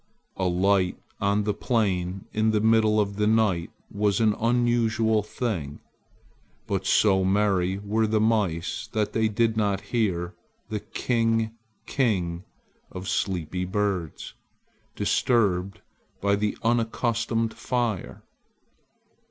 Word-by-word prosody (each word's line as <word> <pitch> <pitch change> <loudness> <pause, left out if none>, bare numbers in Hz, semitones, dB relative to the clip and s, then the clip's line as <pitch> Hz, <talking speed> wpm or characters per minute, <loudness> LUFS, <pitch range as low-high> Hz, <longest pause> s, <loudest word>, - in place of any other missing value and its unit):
A 95 - -2
light 95 +1 +2 0.2
on 100 +1 +1
the 105 0 0
plain 100 -5 -1
in 110 +1 +2
the 110 -1 +2
middle 110 0 +3
of 100 -1 -1
the 105 0 +2
night 105 -6 +2 0.2
was 100 0 +1
an 110 -2 +3
unusual 115 -2 +2
thing. 100 - -4 0.9
But 95 -4 -2
so 95 -3 +4
merry 95 -1 +1
were 105 +2 0
the 110 0 +1
mice 105 -2 0
they 110 +1 0
did 110 +1 +1
not 100 -3 +1
hear 90 -6 0 0.4
the 105 - -2
"king, 115 +1 0 0.3
king" 90 -9 0 0.5
of 90 +1 -7
sleepy 90 -3 -1
birds, 95 -3 -2 0.6
disturbed 100 -6 +1 0.4
by 100 0 +2
the 105 0 -1
unaccustomed 115 -1 0
fire. 120 -6 -3
105 Hz, 110 wpm, -25 LUFS, 95-110 Hz, 0.9 s, so